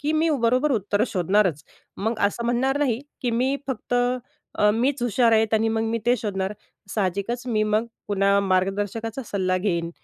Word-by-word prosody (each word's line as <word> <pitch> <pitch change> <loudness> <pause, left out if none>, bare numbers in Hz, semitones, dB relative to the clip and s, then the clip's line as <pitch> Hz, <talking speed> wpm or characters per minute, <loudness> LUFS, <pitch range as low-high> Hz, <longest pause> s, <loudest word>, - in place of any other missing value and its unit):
की 300 +2 0
मी 320 +1 +2
बरोबर 255 +5 +2
उत्तरं 205 0 +1
शोधणारच, 185 -4 +1 0.3
मग 220 +3 -2
असं 235 +3 -4
म्हणणार 260 +4 +1
नाही 255 -5 +1 0.2
की 245 - +1
मी 255 +4 +1
फक्त 245 -1 -3 0.6
अ, 210 0 +5
मीच 250 +4 0
हुशार 240 0 +3
आहे. 220 0 +4
आणि 220 +1 +3
मग 225 0 0
मी 225 +1 -1
ते 245 +1 +4
शोधणार. 195 -3 -2 0.4
साहजिकच 205 +5 -2
मी 215 -3 +1
मग 215 +2 +1 0.2
पुन्हा 200 0 +3
मार्गदर्शकाचा 200 +5 -1
सल्ला 185 -3 0
घेईन 170 -4 -1
220 Hz, 165 wpm, -24 LUFS, 200-245 Hz, 0.6 s, अ